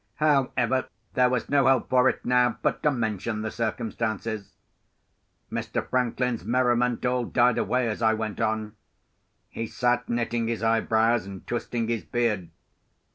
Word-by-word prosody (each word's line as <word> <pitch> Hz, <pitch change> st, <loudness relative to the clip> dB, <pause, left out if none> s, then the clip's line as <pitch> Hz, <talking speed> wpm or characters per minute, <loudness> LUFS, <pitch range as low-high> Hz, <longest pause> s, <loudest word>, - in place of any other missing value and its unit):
However, 130 Hz, -4 st, +1 dB, 0.3 s
there 125 Hz, -2 st, +4 dB
was 125 Hz, -2 st, -1 dB
no 140 Hz, -2 st, +3 dB
help 135 Hz, -1 st, +3 dB
for 130 Hz, 0 st, +4 dB
it -, -, -5 dB
now 125 Hz, -1 st, +3 dB
but -, -, 0 dB
to 150 Hz, -, +3 dB
mention 110 Hz, -4 st, -2 dB
the 110 Hz, -, -3 dB
circumstances. 110 Hz, -1 st, -3 dB, 1.0 s
Mr. -, -, -3 dB
Franklin's 125 Hz, -1 st, 0 dB
merriment 125 Hz, -1 st, +1 dB
all 125 Hz, 0 st, +1 dB
died 120 Hz, 0 st, +3 dB
away 125 Hz, -1 st, +1 dB
as 110 Hz, +1 st, -3 dB
I 110 Hz, -1 st, +3 dB
went 110 Hz, 0 st, -4 dB
on. 110 Hz, -1 st, -1 dB, 0.7 s
He 115 Hz, -, -4 dB
sat 120 Hz, +1 st, 0 dB
knitting 120 Hz, -1 st, -1 dB
his 115 Hz, -1 st, -2 dB
eyebrows, 115 Hz, 0 st, +2 dB
and 95 Hz, -1 st, -9 dB
twisting 120 Hz, -1 st, -2 dB
his 115 Hz, -2 st, -1 dB
beard. 110 Hz, -7 st, -1 dB
120 Hz, 145 wpm, -26 LUFS, 110-125 Hz, 1.0 s, there